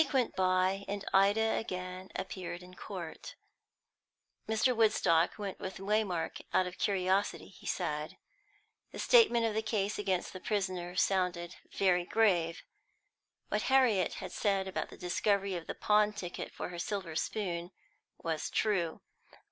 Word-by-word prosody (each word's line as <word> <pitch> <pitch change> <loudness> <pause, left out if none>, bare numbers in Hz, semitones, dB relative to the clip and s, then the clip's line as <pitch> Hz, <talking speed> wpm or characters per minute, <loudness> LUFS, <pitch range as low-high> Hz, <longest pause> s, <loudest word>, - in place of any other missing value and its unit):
S." - - +4
The - - -9
week 270 - -8
went 255 -3 +2
by, 185 +1 +2
and 200 0 -4
Ida 205 +3 +4
again 185 -2 -5
appeared 180 -1 -5
in 180 0 -13
court. 185 - -7 1.1
Mr. 220 +3 +3
Woodstock 210 -7 +3
went 200 -2 -5
with 190 -1 -5
Waymark, 195 -4 -1
out 185 - +3
of 180 0 -7
curiosity, 195 0 +1
he - - -13
said. 150 -4 -2 0.7
The - - -8
statement 340 - +5
of 225 - 0
the 220 - +1
case 210 -2 -1
against 190 -3 -1
the 185 - -6
prisoner 185 -4 -2
sounded 180 -2 0
very 180 -2 +3
grave. 180 -6 +2 0.9
What - - 0
Harriet 245 -9 +4
had - - -6
said 195 -2 0
about 190 - -3
the - - -11
discovery 200 +2 +1
of 170 -2 -5
the - - -4
pawn 210 0 +3
ticket 180 -4 -5
for - - -5
her 175 -1 -7
silver 185 -3 -3
spoon 175 -2 -2 0.5
was 160 -2 -2
true. 175 -7 0
190 Hz, 150 wpm, -32 LUFS, 180-210 Hz, 1.1 s, statement